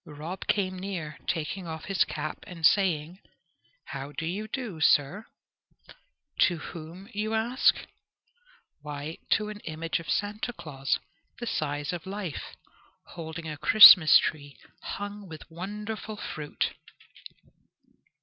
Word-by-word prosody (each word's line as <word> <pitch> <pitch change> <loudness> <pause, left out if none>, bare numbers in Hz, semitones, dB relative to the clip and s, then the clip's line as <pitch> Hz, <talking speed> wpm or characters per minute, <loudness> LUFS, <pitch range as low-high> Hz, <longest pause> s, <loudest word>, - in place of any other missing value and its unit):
Rob 155 +5 -7
came 185 -2 0
near 175 -6 -5
taking 170 +2 -2
off 160 -1 -6
his 195 -2 +2
cap 155 0 -5
and 165 -3 -3
saying, 175 -2 +2 0.7
"How 135 +2 -6
do 160 - -4
you 200 +6 -3
do, 220 - -5
sir?" 155 +9 +3 1.1
To 175 -3 +4
whom? 170 +4 -9
you 215 +2 -1
ask. 235 +4 +3 1.1
Why, 150 +2 -6
to 215 0 0
an 210 -1 -7
image 165 -2 -3
of 165 - -10
Santa 210 +4 -1
Claus, 135 - -2 0.4
the 240 - -4
size 145 -6 -2
of 175 +1 -6
life, 195 -5 -5 0.5
holding 160 -1 -7
a 150 -1 -5
Christmas 205 -6 +10
tree 145 -2 -3 0.2
hung 205 -1 -6
with 160 +1 -11
wonderful 210 +4 -6
fruit. 150 -6 -3
175 Hz, 120 wpm, -28 LUFS, 155-205 Hz, 1.1 s, Christmas